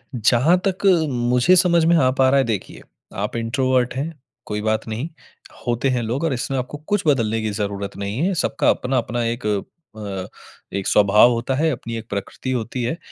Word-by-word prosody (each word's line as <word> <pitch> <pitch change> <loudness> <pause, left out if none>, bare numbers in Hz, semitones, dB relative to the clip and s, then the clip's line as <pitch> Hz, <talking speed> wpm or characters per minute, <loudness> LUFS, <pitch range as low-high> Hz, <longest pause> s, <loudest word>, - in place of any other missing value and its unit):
जहाँ 125 - +3
तक 190 +1 -2 0.2
मुझे 125 +5 +3
समझ 170 -2 +4
में 170 +1 +4
आ 135 -6 +4
पा 130 0 +3
रहा 140 - +4
है 135 - +4
देखिए, 110 -5 -4 0.3
आप 105 +3 -3
इंट्रोवर्ट 125 +2 0
हैं, 150 +5 -3 0.3
कोई 105 0 -3
बात 110 +1 -1
नहीं। 115 +8 -4 0.6
होते 120 +2 0
हैं 125 -2 0
लोग 120 +7 -2
और 160 -4 +1
इसमें 130 +2 -2
आपको 130 +3 -4
कुछ 205 -2 +1
बदलने 115 -6 +2
की 110 - -1
ज़रूरत 100 -1 -4
नहीं 100 +2 -4
है। 195 - +1
सबका 160 -4 +1
अपना 130 +1 0
अपना 120 0 -1
एक 115 0 -3 0.5
अ, 100 -3 -5 0.5
एक 100 - -3
स्वभाव 105 +4 +5
होता 120 +3 -1
है, 160 +4 +2
अपनी 115 -3 -5
एक 115 0 -8
प्रकृति 105 +5 -4
होती 125 0 -3
है 125 +8 -2
120 Hz, 190 wpm, -21 LUFS, 110-135 Hz, 0.6 s, स्वभाव